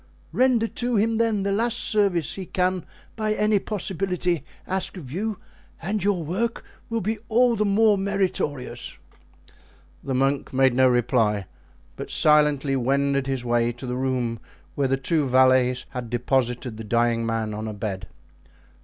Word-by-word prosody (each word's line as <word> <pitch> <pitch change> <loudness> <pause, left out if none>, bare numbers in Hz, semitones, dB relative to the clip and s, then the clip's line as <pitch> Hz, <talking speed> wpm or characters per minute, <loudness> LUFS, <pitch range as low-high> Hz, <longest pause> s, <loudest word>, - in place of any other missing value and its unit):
Render 250 -3 +3
to 245 +1 -2
him, 220 +2 +2
then, 225 -3 +1
the 200 - 0
last 230 +3 +1
service 200 - +1
he 190 -2 -7
can 185 -1 -1 0.3
by 215 -1 -1
any 210 -1 +2
possibility 180 -4 -2 0.2
ask 190 +1 -3
of 135 -8 -9
you, 210 +5 -2 0.4
and 195 +3 -2
your 195 -4 +1
work 210 +9 -2 0.3
will 230 -1 -1
be 215 +3 -2
all 240 +1 +4
the 210 -1 +1
more 205 0 +4
meritorious." 190 -9 -2 1.1
The 135 - -2
monk 135 +2 0
made 130 -1 +4
no 130 +1 +5
reply, 115 -5 +2 0.5
but - - -6
silently 150 -2 +3
wended 140 +1 +1
his 135 -2 -2
way 120 0 +2
to 120 +3 -9
the 125 0 -3
room 125 -3 -1 0.3
where 140 -1 0
the 135 +1 +1
two 150 +1 0
valets 130 -1 +3
had 125 -3 -6
deposited 120 -1 -1
the 110 - -6
dying 115 +1 +1
man 115 -1 -2
on 110 +1 -4
a 110 - -4
bed. 100 -3 -4
145 Hz, 155 wpm, -24 LUFS, 125-200 Hz, 1.1 s, no